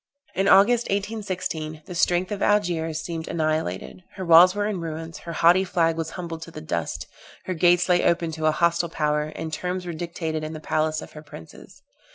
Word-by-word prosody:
In 195 +1 0
August, 230 +5 +5
1816, 185 -7 -3
the 185 - -8
strength 175 +2 +1
of 205 -1 -4
Algiers 170 -6 +1
seemed 165 0 -5
annihilated; 155 - -2
her 190 - -5
walls 175 +3 +7
were 205 0 0
in 205 -4 -2
ruins, 165 0 -6
her 170 - -8
haughty 175 +4 +5
flag 165 -3 +1
was 165 -1 -3
humbled 170 -2 -6
to 165 - -8
the 155 - -9
dust; 120 - -3 0.4
her 185 - -2
gates 175 +1 +3
lay 180 -1 +3
open 170 -1 +1
to 160 0 -1
a - - +5
hostile 170 +1 +1
power, 150 -1 -1
and 160 -1 -5
terms 180 +3 -3
were 175 - -4
dictated 160 -1 -4
in 155 +1 -5
the 155 - -6
palace 155 0 -1
of - - -12
her 150 - -10
princes. 80 - -14
165 Hz, 200 wpm, -24 LUFS, 155-180 Hz, 0.4 s, walls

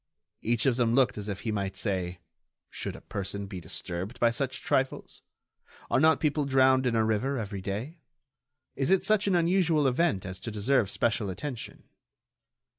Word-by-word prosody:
Each 115 +2 0
of 130 -3 +3
them 120 -2 +2
looked 130 -2 +3
as 105 +1 -5
if 100 - -4
he 110 - -2
might 100 -2 -3
say: 90 -3 -2 0.5
Should - - -5
a - - -11
person 100 +1 -4
be 95 -2 -7
disturbed 90 +6 -4
by 120 -1 +4
such 130 +2 -3
trifles? 130 0 -1 0.7
Are - - +4
not 160 +2 +5
people 150 -1 +1
drowned 130 -1 +4
in 120 - +1
a 110 -1 +3
river 110 +6 0
every 100 -4 -4
day? 110 - -5 0.8
Is 135 - -1
it 190 -1 +4
such 210 -1 +2
an 190 - +3
unusual 170 -3 +3
event 135 - +1
as 95 0 -5
to - - -5
deserve 110 +1 +1
special 115 -2 0
attention? 115 +6 -6
120 Hz, 175 wpm, -28 LUFS, 100-140 Hz, 0.8 s, not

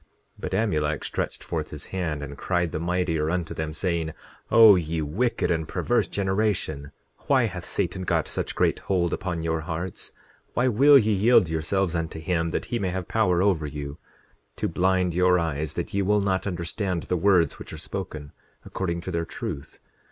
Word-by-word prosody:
10:25 - - -34 0.3
But - - -4
Amulek 75 -9 0
stretched - - -3
forth 80 -2 -3
his 75 - -8
hand, 80 -6 -2
and 70 0 -7
cried 90 +1 -1
the - - -3
mightier 85 -2 0
unto 85 -1 -2
them, 80 -1 -3
saying: 80 -1 -2 0.4
O 110 -3 +9
ye 80 -2 -1
wicked 105 +12 0
and 80 -2 0
perverse - - +1
generation, 95 -8 -1 0.4
why 130 -4 +4
hath 95 -5 -5
Satan 90 +1 -2
got 95 - 0
such - - -3
great - - +2
hold 90 -3 0
upon 85 -3 -3
your 80 -1 0
hearts? 85 +2 -5 0.4
Why 125 - +3
will 140 +5 +7
ye 110 -4 +3
yield 105 0 +5
yourselves 85 +3 0
unto 80 -1 -3
him 85 0 0
that - - -2
he 120 - +1
may 95 - -1
have 90 -1 -4
power 95 -5 +2
over 90 -7 +2
you, 70 0 -6 0.6
to - - -1
blind 90 -1 +1
your 90 +1 +4
eyes, 80 -2 -2
that 85 +4 -4
ye 100 - +1
will 105 +2 +3
not 95 0 0
understand 90 0 -2
the 90 - -1
words 90 -3 +3
which - - -9
are - - -7
spoken, 75 -2 -6 0.3
according 85 -3 -3
to 95 - -5
their 85 -1 -1
truth? 70 -3 -6
90 Hz, 185 wpm, -25 LUFS, 80-95 Hz, 0.6 s, O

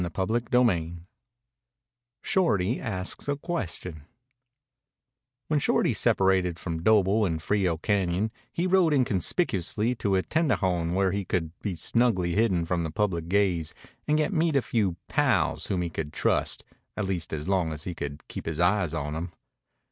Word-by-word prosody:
CHAPTER 95 +5 -2
XXXVII 105 -9 +1 1.3
SHORTY 120 - +1
ASKS 95 +1 -3
A 145 - +1
QUESTION 95 - -4 1.5
When 150 -1 +2
Shorty - - +2
separated 95 -3 +2
from 85 -2 -4
Doble 105 +1 +4
in 85 -5 0
Frio 90 0 0
Cañon 95 +2 0 0.2
he 170 - -1
rode 180 -4 +4
inconspicuously 110 - +1
to 100 -5 0
a 95 - +2
tendejon 95 - 0
where 95 -1 +2
he 100 +1 -2
could 85 -3 -2
be 100 -4 -3
snugly 95 -1 +1
hidden 95 -5 +2
from 85 0 -1
the 80 - -2
public 85 -1 -1
gaze 90 -5 +1 0.3
and 150 0 +3
yet 155 +6 0
meet 160 -2 +1
a 135 - +3
few 100 -7 0
"pals" - - +1
whom 90 -2 -1
he 85 - -2
could 75 -2 -5
trust - - 0 0.3
at 105 - -1
least 90 -4 -2
as 75 +1 -4
long 95 -4 +1
as 75 0 -6
he 90 - -4
could 75 -2 -6
keep - - -7
his 80 -1 -3
eyes 90 -2 +2
on 75 -1 -3
them. 85 +3 -4
95 Hz, 155 wpm, -27 LUFS, 85-110 Hz, 1.5 s, Doble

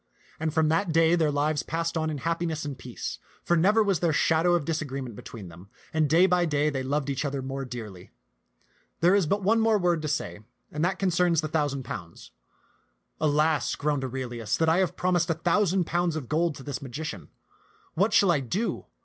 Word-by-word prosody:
And 160 0 -1
from 160 0 +2
that 170 +3 +1
day 165 +1 +4
their 165 -3 +3
lives 145 +1 0
passed 165 +1 -3
on 160 -1 0
in 150 - -3
happi 165 +4 -1
ness 160 -1 -3
and 145 -2 -4
peace; 125 -2 -7 0.2
for 175 - +2
never 205 +7 +4
was 195 -5 +1
there 170 -2 +2
shadow 160 +3 +3
of 165 -5 -1
disagree 150 -4 -3
ment 125 -5 -7
between 105 -2 -9
them, 85 +4 -14 0.2
and 155 -2 +2
day 170 +5 +5
by 180 -1 +3
day 150 -1 +1
they 135 -2 -2
loved 140 +2 -1
each 135 -1 -2
other 140 -2 -3
more 135 +1 -4
dearly. 110 -8 -8 0.9
There 175 +3 +5
is 200 -5 +3
but 200 +4 0
one 225 +4 +3
more 225 -1 +3
word 175 -4 +1
to 155 - -3
say, 90 -10 -3 0.3
and 150 +1 -2
that 185 +2 +1
con 195 - +1
cerns 170 -2 +2
the 155 - -3
thousand 145 -4 -1
pounds. - - -8 0.4
" - - -34
Alas," 155 0 +2
groaned 145 -2 -1
Aurelius, 120 -4 -3
"that 160 - +1
I 165 - +3
have 185 -2 0
promised 175 -2 +1
a 165 - +2
thousand 185 +3 +2
pounds 175 0 0
of 150 -6 -5
gold 160 +2 0
to 135 - -10
this 140 -2 -5
magician. 130 - -6 0.6
What 195 +6 +2
shall 200 -6 +5
I 160 - +2
do 180 - -3
155 Hz, 215 wpm, -27 LUFS, 140-175 Hz, 0.9 s, day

